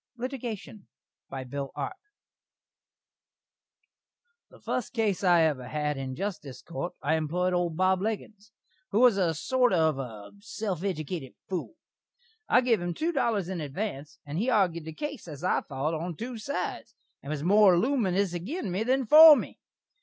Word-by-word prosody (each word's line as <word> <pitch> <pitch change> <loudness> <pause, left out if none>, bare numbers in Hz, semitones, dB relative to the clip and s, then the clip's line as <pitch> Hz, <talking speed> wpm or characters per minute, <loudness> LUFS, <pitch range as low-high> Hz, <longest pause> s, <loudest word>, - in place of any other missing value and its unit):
LITIGATION 235 -5 -6 0.4
BY 135 -1 -5
BILL 135 +1 -5
ARP 370 - -4 2.5
The - - -18
fust 250 - -3
case 215 -6 0
I 175 -3 +5
ever 140 -6 0
had 150 0 -2
in 135 -1 -5
a - - -7
Justice 170 -9 -5
Court 175 +1 -5
I 145 - +1
emploid 170 +4 0
old 175 -2 -1
Bob 185 0 +2
Leggins, 215 0 -5 0.4
who 210 - +1
was 245 -5 +6
a 170 -4 +1
sorter 250 - +2
of 160 -4 +2
a 110 -6 -7
self 200 -4 -4
eddicated 160 -6 -4
fool. 190 - -4 0.7
I 250 - +5
giv 235 -6 +2
him 175 -1 -3
two 330 +2 -1
dollars 225 - 0
in 185 -3 -4
advanse, 150 0 -5
and 145 +3 -4
he 230 - 0
argud 185 -9 +1
the 160 - -7
case 290 - -6
as 150 -2 -9
I 185 - +2
thot, 145 +2 -3
on 165 +2 -4
two 235 +5 -6
sides, 280 +6 -4 0.3
and 140 - -9
was 150 -1 -3
more 200 +1 +6
luminus 200 -5 +1
agin 200 - -4
me 185 +4 -1
than 260 +3 +1
for 310 +5 +10
me. - - -5
185 Hz, 165 wpm, -28 LUFS, 155-225 Hz, 2.5 s, for